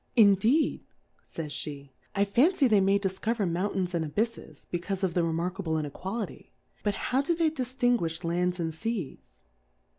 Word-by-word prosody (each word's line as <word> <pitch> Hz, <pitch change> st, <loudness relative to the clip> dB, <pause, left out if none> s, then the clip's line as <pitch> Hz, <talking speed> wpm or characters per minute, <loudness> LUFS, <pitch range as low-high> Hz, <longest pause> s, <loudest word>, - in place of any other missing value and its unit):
Indeed, 225 Hz, +7 st, +4 dB, 0.4 s
fays 155 Hz, -3 st, -6 dB
fl:e^ 140 Hz, -2 st, -8 dB, 0.3 s
I 200 Hz, +1 st, +3 dB
fancy 275 Hz, -, +4 dB
they 210 Hz, -4 st, +4 dB
may 195 Hz, +1 st, +4 dB
difcover 200 Hz, +2 st, -1 dB
Mountains 180 Hz, +1 st, -1 dB
and 170 Hz, -2 st, 0 dB
Abyffes, 180 Hz, -1 st, -3 dB
be 175 Hz, -, 0 dB
caufe 195 Hz, +2 st, -4 dB
of 185 Hz, -3 st, +1 dB
the 175 Hz, -, +2 dB
remarkable 170 Hz, +1 st, -1 dB
Inequahty; 185 Hz, +8 st, -4 dB, 0.3 s
but 205 Hz, -1 st, 0 dB
how 260 Hz, +6 st, +1 dB
do 335 Hz, +4 st, 0 dB
they 325 Hz, -2 st, +2 dB
diilinguifli 245 Hz, -, 0 dB
Lands 180 Hz, +2 st, 0 dB
and 165 Hz, -1 st, -1 dB
Seas? 165 Hz, -, -4 dB
195 Hz, 150 wpm, -28 LUFS, 170-230 Hz, 0.4 s, Indeed